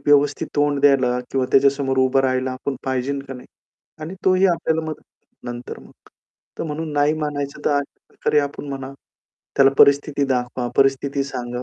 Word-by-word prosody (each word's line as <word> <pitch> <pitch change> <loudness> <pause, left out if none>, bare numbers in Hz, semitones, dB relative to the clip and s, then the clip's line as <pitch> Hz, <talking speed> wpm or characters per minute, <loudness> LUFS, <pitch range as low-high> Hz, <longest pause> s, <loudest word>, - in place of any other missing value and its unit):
व्यवस्थित 145 0 +3
तोंड 145 -1 +2
द्यायला 135 -3 +3
किंवा 135 -1 0
त्याच्यासमोर 135 -1 +3
उभा 130 +1 +3
राहायला 130 0 0
आपण 135 +2 -4
पाहिजे 130 +1 -2
का 135 - -6
नाही? 125 - -11 0.6
आणि 165 +5 -6
तोही 185 +1 +4
आपल्याला 165 -2 0
मदत 155 - -8 0.4
नंतर 120 0 -7
मग. - - -17 0.7
तर - - -2
म्हणून 155 0 -4
नाही 145 +1 +2
म्हणायचं, 145 -1 -4
तर - - +2
अशा 145 -1 -2
प्रकारे 150 - 0
आपण 145 0 -5
म्हणा, 135 -1 -6 0.6
त्याला 135 0 +6
परिस्थिती 140 0 +4
दाखवा, 125 -1 -2
परिस्थिती 135 +1 +2
सांगा. 125 -2 -5
140 Hz, 160 wpm, -21 LUFS, 130-145 Hz, 0.7 s, त्याला